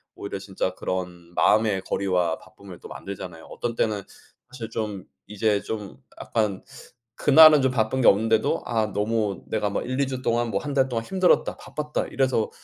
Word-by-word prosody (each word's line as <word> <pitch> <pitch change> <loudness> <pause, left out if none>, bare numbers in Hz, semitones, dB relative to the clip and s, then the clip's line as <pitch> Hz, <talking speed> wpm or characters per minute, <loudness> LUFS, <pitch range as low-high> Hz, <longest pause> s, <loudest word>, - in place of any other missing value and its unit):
오히려 100 -1 -6
진짜 95 -1 -3
그런 90 -2 -5
마음의 105 -3 +3
거리와 90 -4 0
바쁨을 95 -3 -14
또 - - -12
만들잖아요. 90 -4 -8
어떤 120 -1 -5
때는 105 -2 0 0.5
사실 115 -3 -7
좀 105 -4 -4 0.2
이제 105 0 0
좀 105 -3 -6 0.2
약간 105 -4 -1 0.5
그날은 150 0 +8
좀 130 -1 +2
바쁜 125 +2 0
게 - - +4
없는데도 110 +2 +3
'아 110 -2 0
너무 105 -2 -1
내가 105 -2 -1
막 - - -3
1-2 135 +1 0
주 130 -1 -4
동안 120 -1 0
뭐 100 - 0
1 145 - -5
달 135 -1 +2
동안 115 -2 -2
힘들었다. 185 -1 +2
바빴다.' 150 -1 -4
이래서 130 -5 0
110 Hz, 325 characters per minute, -25 LUFS, 100-125 Hz, 0.5 s, 그날은